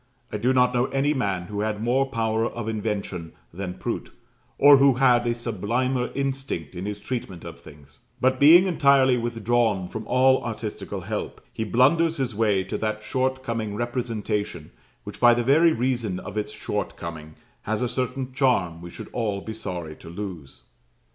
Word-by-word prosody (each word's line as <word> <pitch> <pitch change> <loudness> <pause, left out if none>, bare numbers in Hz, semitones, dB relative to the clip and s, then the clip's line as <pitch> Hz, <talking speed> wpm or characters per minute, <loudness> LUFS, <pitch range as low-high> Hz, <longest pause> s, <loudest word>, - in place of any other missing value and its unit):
I - - -2
do 125 - +1
not 125 -1 +3
know 120 0 +2
any 140 +2 +1
man 100 -10 -1
who 100 +3 -6
had 105 0 -1
more 130 +3 +2
power 115 -3 0
of 120 -2 -6
invention 105 -6 -3 0.2
than 90 0 -5
Prout, - - -4 0.5
or 145 0 +8
who 135 0 +5
had 120 -2 +4
a 120 - +1
sublimer 120 +3 -1
instinct 135 - -3
in 90 +2 -5
his 105 0 -4
treatment 100 -8 -5
of - - -9
things; 70 -1 -16 0.2
but 130 0 +2
being 165 +6 +8
entirely 140 -7 +4
withdrawn 115 -4 0
from 110 +4 -7
all 130 +1 +4
artistical 110 -2 -5
help, - - -5
he 110 - -3
blunders 155 +9 +3
his 130 -4 -1
way 105 -3 +2
to 95 - -4
that 110 0 -2
short 130 +3 -1
coming 115 -4 -3
representation, 110 - -3 0.3
which, - - -9
by 120 -1 +6
the 120 - 0
very 155 +7 +5
reason 120 -7 -1
of 105 - -8
its 105 -1 -2
short - - -4
coming, 80 -2 -8 0.3
has 110 +2 -2
a - - +1
certain 130 +1 -3
charm 95 -12 +1
we 85 - -8
should - - -9
all 105 -5 -1
be 110 +3 -7
sorry 85 -7 -6
to 80 - -12
lose. 85 -7 -8
115 Hz, 175 wpm, -24 LUFS, 100-130 Hz, 0.5 s, or